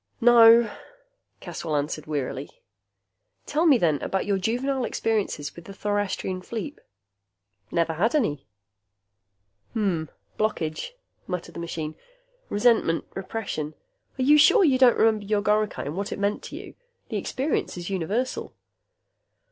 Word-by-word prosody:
"No," 235 Hz, -1 st, +7 dB, 0.7 s
Caswell 160 Hz, -3 st, -4 dB
answered 150 Hz, +1 st, -2 dB
wearily. 140 Hz, -2 st, -3 dB, 1.0 s
"Tell 315 Hz, +4 st, +1 dB
me, 285 Hz, -5 st, +7 dB
then, 160 Hz, -8 st, +1 dB
about 190 Hz, -, -1 dB
your 200 Hz, -1 st, +1 dB
juvenile 250 Hz, +6 st, -1 dB
experiences 210 Hz, -12 st, -2 dB
with 170 Hz, -, -11 dB
the 195 Hz, -, -9 dB
thorastrian 205 Hz, -2 st, -2 dB
fleep." 235 Hz, +9 st, -6 dB, 0.9 s
"Never 165 Hz, +2 st, 0 dB
had 210 Hz, -, +1 dB
any." 180 Hz, -, 0 dB, 1.3 s
"Hmm. 190 Hz, -7 st, 0 dB, 0.3 s
Blockage," 215 Hz, -, -2 dB, 0.3 s
muttered 180 Hz, -1 st, -5 dB
the -, -, -7 dB
machine. 160 Hz, -2 st, -4 dB, 0.6 s
"Resentment. 205 Hz, -6 st, +2 dB
Repression. 190 Hz, -6 st, -4 dB, 0.4 s
Are 260 Hz, -, 0 dB
you 295 Hz, +3 st, +6 dB
sure 385 Hz, +8 st, +6 dB
you 270 Hz, -6 st, +4 dB
don't 250 Hz, -3 st, +6 dB
remember 220 Hz, -2 st, +3 dB
your 205 Hz, 0 st, 0 dB
goricae 210 Hz, 0 st, +1 dB
and 145 Hz, -, -4 dB
what 200 Hz, +2 st, -3 dB
it -, -, -3 dB
meant 200 Hz, +1 st, -1 dB
to -, -, -8 dB
you? -, -, -9 dB, 0.4 s
The -, -, -2 dB
experience 270 Hz, -7 st, -2 dB
is 175 Hz, +2 st, -5 dB
universal." 200 Hz, +8 st, -2 dB
205 Hz, 130 wpm, -25 LUFS, 170-235 Hz, 1.3 s, No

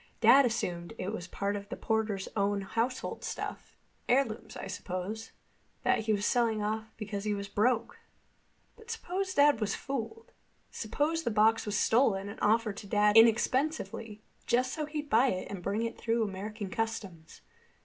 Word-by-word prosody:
"Dad 275 Hz, 0 st, +7 dB
assumed 175 Hz, -6 st, -3 dB
it 190 Hz, +3 st, -3 dB
was 180 Hz, -5 st, -5 dB
part 200 Hz, +2 st, -2 dB
of 200 Hz, 0 st, -6 dB
the 255 Hz, -, -4 dB
porter's 220 Hz, -4 st, -1 dB
own 200 Hz, -1 st, +1 dB
household 230 Hz, +6 st, -2 dB
stuff—heirlooms, 230 Hz, -4 st, -3 dB
I -, -, -6 dB
suppose—that 195 Hz, +5 st, -4 dB
he 220 Hz, 0 st, -1 dB
was 205 Hz, -1 st, +1 dB
selling 230 Hz, -3 st, +2 dB
off 220 Hz, +1 st, -2 dB
because 205 Hz, -2 st, -4 dB
he 210 Hz, -1 st, 0 dB
was 200 Hz, 0 st, -5 dB
broke. 220 Hz, +4 st, 0 dB, 0.8 s
But 450 Hz, 0 st, -17 dB
suppose 385 Hz, -4 st, -3 dB
Dad 285 Hz, -5 st, +5 dB
was 210 Hz, -, 0 dB
fooled? 275 Hz, -, -5 dB, 0.4 s
Suppose 295 Hz, +9 st, -1 dB
the 280 Hz, -, -1 dB
box 220 Hz, +1 st, +3 dB
was 210 Hz, 0 st, 0 dB
stolen 210 Hz, -5 st, +2 dB
and 205 Hz, -, -9 dB
offered 220 Hz, -1 st, +2 dB
to 205 Hz, -, -8 dB
Dad 210 Hz, +1 st, +3 dB
inexpensively, 225 Hz, -2 st, +3 dB, 0.2 s
just 255 Hz, +2 st, +2 dB
so 305 Hz, -2 st, -3 dB
he'd 300 Hz, -1 st, -4 dB
buy 240 Hz, +1 st, +4 dB
it 185 Hz, -6 st, -2 dB
and 195 Hz, -3 st, -5 dB
bring 210 Hz, +5 st, -1 dB
it 230 Hz, -, -4 dB
through 230 Hz, 0 st, +1 dB
American 205 Hz, 0 st, -5 dB
customs. 205 Hz, -8 st, -4 dB
220 Hz, 160 wpm, -30 LUFS, 205-245 Hz, 0.8 s, Dad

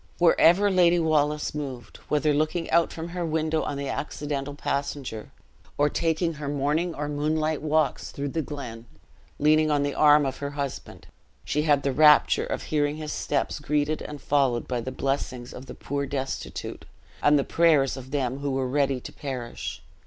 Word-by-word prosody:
Wherever 175 Hz, +3 st, +5 dB
Lady 175 Hz, -2 st, +4 dB
Wallace 150 Hz, -2 st, +1 dB
moved 135 Hz, -6 st, -6 dB
whether 150 Hz, 0 st, +2 dB
looking 155 Hz, +3 st, 0 dB
out 170 Hz, 0 st, +3 dB
from 165 Hz, +1 st, -6 dB
her 175 Hz, 0 st, -3 dB
window 160 Hz, -1 st, 0 dB
on 145 Hz, -, -3 dB
the 140 Hz, 0 st, -3 dB
accidental 145 Hz, 0 st, -4 dB
passenger, 140 Hz, -6 st, -4 dB, 0.5 s
or 145 Hz, +1 st, +3 dB
taking 165 Hz, +2 st, 0 dB
her 150 Hz, -2 st, -6 dB
morning 150 Hz, +5 st, 0 dB
or 150 Hz, 0 st, -3 dB
moonlight 155 Hz, +1 st, -1 dB
walks 155 Hz, +1 st, 0 dB
through 140 Hz, 0 st, -4 dB
the 160 Hz, +4 st, -1 dB
glen, 120 Hz, -6 st, -7 dB, 0.5 s
leaning 155 Hz, +1 st, +4 dB
on 145 Hz, -1 st, +2 dB
the 145 Hz, 0 st, -1 dB
arm 150 Hz, -1 st, +5 dB
of 135 Hz, -, -3 dB
her 145 Hz, -, -4 dB
husband 140 Hz, -2 st, -5 dB, 0.4 s
she 150 Hz, -, 0 dB
had 145 Hz, -2 st, +2 dB
the 140 Hz, -, +1 dB
rapture 150 Hz, +1 st, +5 dB
of -, -, -3 dB
hearing 145 Hz, -1 st, 0 dB
his 155 Hz, -1 st, -5 dB
steps -, -, -1 dB
greeted 150 Hz, +1 st, 0 dB
and 150 Hz, -1 st, -7 dB
followed 135 Hz, -5 st, +1 dB
by 125 Hz, -2 st, -2 dB
the 130 Hz, -, -5 dB
blessings 130 Hz, -2 st, -3 dB
of 130 Hz, +1 st, -10 dB
the -, -, -8 dB
poor 140 Hz, 0 st, -3 dB
destitute, 135 Hz, -1 st, -5 dB, 0.4 s
and 145 Hz, 0 st, +5 dB
the 140 Hz, -, +2 dB
prayers 155 Hz, -6 st, +3 dB
of 130 Hz, -1 st, -9 dB
them 135 Hz, -2 st, -1 dB
who 140 Hz, 0 st, -2 dB
were 135 Hz, -1 st, -1 dB
ready 135 Hz, 0 st, +1 dB
to -, -, -10 dB
perish. 120 Hz, -, -6 dB
145 Hz, 175 wpm, -26 LUFS, 135-155 Hz, 0.5 s, Wherever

